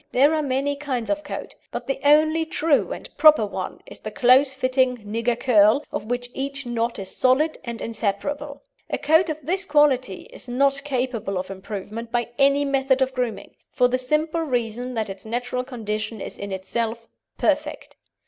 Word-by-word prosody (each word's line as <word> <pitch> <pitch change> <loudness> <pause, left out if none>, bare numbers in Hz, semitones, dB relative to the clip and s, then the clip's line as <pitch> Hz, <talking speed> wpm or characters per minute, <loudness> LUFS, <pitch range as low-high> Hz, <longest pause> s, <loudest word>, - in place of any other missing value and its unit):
There 280 +5 +5
are 310 - +1
many 280 0 0
kinds 275 -4 -3
of 300 0 -1
coat, - - -6 0.2
but - - -5
the 270 - -2
only 310 +2 +4
true 315 -2 +1
and - - -6
proper 305 -8 +7
one 205 - -5
is - - -9
the - - -6
close 260 +2 +4
fitting 255 -1 +1
"nigger 230 +3 -1
curl," 220 +1 +4
of - - -4
which 245 +1 -3
each 275 +1 -4
knot 235 -1 -1
is 195 -2 -5
solid 280 +5 +2
and 235 -1 -6
inseparable. 280 - -3 0.3
A - - -1
coat 320 +3 +3
of 310 -2 -5
this 370 +3 0
quality 280 - +2
is - - -4
not 275 +2 +2
capable 250 -8 -2
of 185 +1 -4
improvement 210 +4 -7
by 240 -1 0
any 280 +1 +4
method 270 -1 +2
of 260 0 -3
grooming, 250 -3 -3 0.2
for 250 - +3
the 255 +1 0
simple 305 +5 0
reason 245 -3 -2
that 220 -1 -1
its 195 -1 -8
natural 245 +2 -3
condition 220 -3 -4
is - - -6
in 200 0 -6
itself 225 +4 -3 0.3
perfect. - - -1
255 Hz, 175 wpm, -23 LUFS, 230-285 Hz, 0.3 s, proper